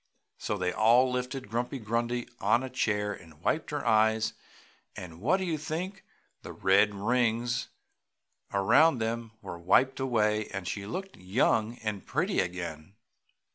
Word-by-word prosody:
So 105 - -2
they 90 -1 -1
all 120 +5 +4
lifted 125 0 -3
Grumpy 120 +5 -2
Grundy 120 +1 -2
on 120 - +2
a 130 - -6
chair 105 -4 0
and 80 -5 -14
wiped 150 - -1
her 145 -3 -3
eyes 110 -1 +3 0.6
and 85 -2 -9
what 150 - +3
do 190 - -2
you 160 -4 -1
think! 180 +6 -4 0.4
the - - -8
red 100 +2 +3
rings 120 +3 0 0.8
around 130 +10 +4
them 115 0 -3
were 85 - -7
wiped 125 +11 +3
away 110 -5 +1
and 95 -2 -6
she 100 +2 -4
looked 190 - -6
young 110 +4 +1
and 105 -3 -3
pretty 185 +8 0
again. 85 -1 -4
110 Hz, 145 wpm, -29 LUFS, 100-130 Hz, 0.8 s, all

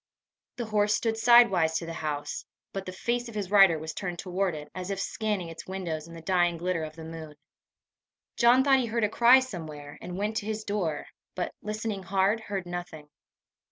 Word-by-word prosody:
The 240 - -4
horse 210 -1 +2
stood 225 0 0
sidewise 225 -9 +5
to 165 - -4
the 165 - -5
house, 145 -2 -4 0.3
but 195 -1 -5
the - - -3
face 240 +5 -2
of 225 - -11
his 200 -3 -3
rider 195 -5 +7
was 160 +1 -6
turned 180 -3 -4
toward 185 -1 -1
it, 150 0 -7
as 185 0 -5
if 195 -1 -2
scanning 210 -4 -2
its 165 - -9
windows 170 -5 -4
in 170 - -11
the 165 - -10
dying 175 -1 +2
glitter 175 -1 -1
of 155 0 -7
the 165 - -9
moon. 160 -2 -8 1.0
John 245 +2 +5
thought 270 -1 +5
he 245 - -1
heard 230 0 -1
a 210 - +3
cry 240 +4 +7
somewhere, 155 - -7
and 180 +1 -6
went 210 +2 -1
to 215 -1 -3
his 215 0 -3
door, 185 -8 -2 0.3
but, 180 - -3
listening 215 -1 -3
hard, 195 +4 +1
heard 200 -4 -4
nothing. 175 -4 -7
190 Hz, 200 wpm, -28 LUFS, 165-215 Hz, 1.0 s, rider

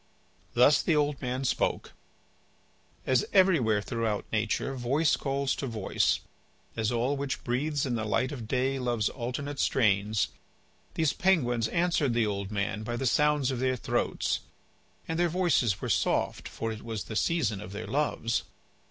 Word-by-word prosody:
Thus 130 +4 +6
the 165 - +2
old 145 -2 +1
man 125 +1 -2
spoke. - - -1 1.1
As 130 -2 +3
everywhere 145 - +4
throughout 115 -3 -2
nature 110 +5 0
voice 135 +5 +2
calls 140 -1 -1
to 135 - -3
voice, 110 -5 0 0.5
as 110 0 0
all 120 +4 +1
which 140 -1 -3
breathes 145 +4 0
in 130 - -1
the 110 -2 -1
light 110 +5 0
of 120 -6 -6
day 130 +2 0
loves 120 -4 0
alternate 135 +3 -4
strains, 105 -3 +2 0.7
these 160 -3 +2
penguins 125 -12 +2
answered 170 -7 +1
the 115 -2 +3
old 100 -2 -3
man 100 0 -2
by 120 +2 -3
the 135 - -2
sounds 150 0 +2
of 130 - -3
their 130 0 +1
throats. 125 - -1 0.7
And 165 +1 -2
their 175 0 +3
voices 155 - +1
were - - -3
soft, - - 0
for 115 - -4
it 110 -1 -7
was 110 -2 -4
the 110 - -7
season 110 - +1
of 95 - -8
their 105 +2 -5
loves. 120 -1 0
125 Hz, 160 wpm, -29 LUFS, 110-145 Hz, 1.1 s, Thus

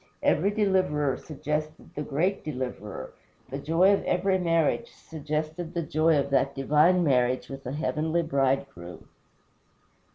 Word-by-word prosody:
Every 185 +6 +3
deliverer 185 -9 +1
suggested 155 +1 -5
the 150 - -4
greater 160 +7 -1
Deliverer; 125 -8 -6 0.4
the 135 - -4
joy 165 +7 +4
of 200 - 0
every 190 +1 +1
marriage 165 +6 +1
suggested 155 +2 -5
the 170 - 0
joy 155 +1 +2
of 140 0 -1
that 140 - +2
divine 150 +6 +3
marriage 125 -4 +1
with 135 -1 -8
a 130 - -4
heavenly 160 +2 0
bridegroom. 135 - -2
155 Hz, 130 wpm, -27 LUFS, 140-170 Hz, 0.4 s, joy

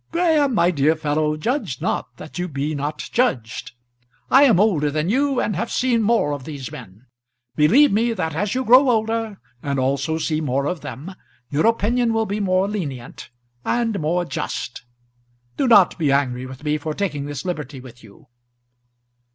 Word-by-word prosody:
"Graham, 315 -6 +2
my 175 -3 +3
dear 155 0 +2
fellow, 155 0 -1
judge 250 - -2
not - - -3
that - - -9
you 180 - -1
be 145 -1 -3
not 145 +1 -4
judged. 125 - -1 0.6
I 275 +2 +7
am 225 -10 +4
older 175 -9 +2
than 155 +5 -1
you, 275 +1 +1
and 210 - -1
have 230 +7 -2
seen 245 -3 +1
more 220 -9 +2
of 140 -2 -6
these 140 -3 -7
men. 110 -1 -12 0.5
Believe 245 - +5
me 230 +4 +2
that 160 -7 -3
as 195 +7 -2
you 260 0 -1
grow 255 +3 +6
older 225 -2 -1 0.2
and 140 -1 -2
also 140 +4 0
see 155 -1 -1
more 140 -1 -1
of 170 +1 -3
them, 165 +8 -8 0.4
your 150 +8 +2
opinion 230 +1 +1
will 225 0 +1
be 205 0 -3
more 190 -1 +1
lenient, 145 - -6 0.3
and 230 -3 0
more 170 +3 0
just. 125 -7 -5 0.7
Do 270 - 0
not 200 -7 +5
be 150 -4 +2
angry 130 -2 0
with 130 +2 -11
me 150 0 0
for 155 +1 -4
taking 150 -8 -2
this 145 0 -6
liberty 150 -6 -4
with 125 -2 -14
you." 110 +7 -17
165 Hz, 175 wpm, -21 LUFS, 145-225 Hz, 0.7 s, I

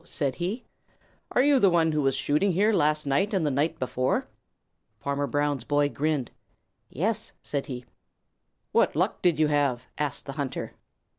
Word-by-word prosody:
said 140 -5 -1
he. 195 +8 -3 0.7
"Are 250 - +4
you 285 -1 +5
the 200 - +5
one 165 -2 +3
who 150 -1 +1
was 135 -1 +1
shooting 155 +8 +1
here 210 +5 +3
last 150 -4 +2
night 190 +10 +1
and 180 -4 +1
the 145 - +1
night 150 +4 0
before?" 130 -1 -1 0.7
Farmer 140 +3 -1
Brown's 145 -3 0
boy 145 +2 +2
grinned. 150 -3 -1 0.6
"Yes," 220 - -1
said 140 -2 -2
he. 125 -2 -6 0.9
"What - - +3
luck - - 0
did 175 -4 +3
you 155 -1 +3
have?" 140 -4 +1
asked 150 -3 -1
the 140 - -5
hunter. 135 - -4
150 Hz, 165 wpm, -27 LUFS, 140-175 Hz, 0.9 s, you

